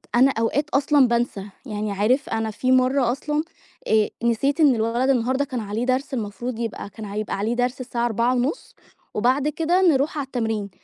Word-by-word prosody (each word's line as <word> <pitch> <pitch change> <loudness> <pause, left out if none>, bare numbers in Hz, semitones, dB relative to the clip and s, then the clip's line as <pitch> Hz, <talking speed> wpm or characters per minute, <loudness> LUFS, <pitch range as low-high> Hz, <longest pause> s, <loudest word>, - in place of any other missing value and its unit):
أنا 260 +3 +5
أوقات 280 +6 0
أصلًا 280 -1 +3
بانسى 235 -4 -1 0.2
يعني 210 -3 -3
عارف 220 +8 +1
أنا 225 0 -1
في 255 +4 -1
مرة 255 -1 +3
أصلًا 295 +4 -2 0.4
آآ، 215 -1 +3
نسيت 245 +6 +1
إن 290 -5 +5
الولد 230 +4 0
النهارده 260 +2 +1
كان 260 -3 -4
عليه 215 +2 -3
درس 265 +3 -1
المفروض 235 +1 -4
يبقى 225 -3 -4
كان 215 +1 -9
هيبقى 210 +1 -3
عليه 215 +4 -1
درس 250 +1 -1
الساعة 240 -2 -2
16:30 245 - -1 0.4
وبعد 260 +6 +1
كده 330 +4 +1
نرُوح 305 -4 +2
على 285 - -2
التمرين، 225 -5 -2
245 Hz, 170 wpm, -23 LUFS, 225-275 Hz, 0.4 s, أنا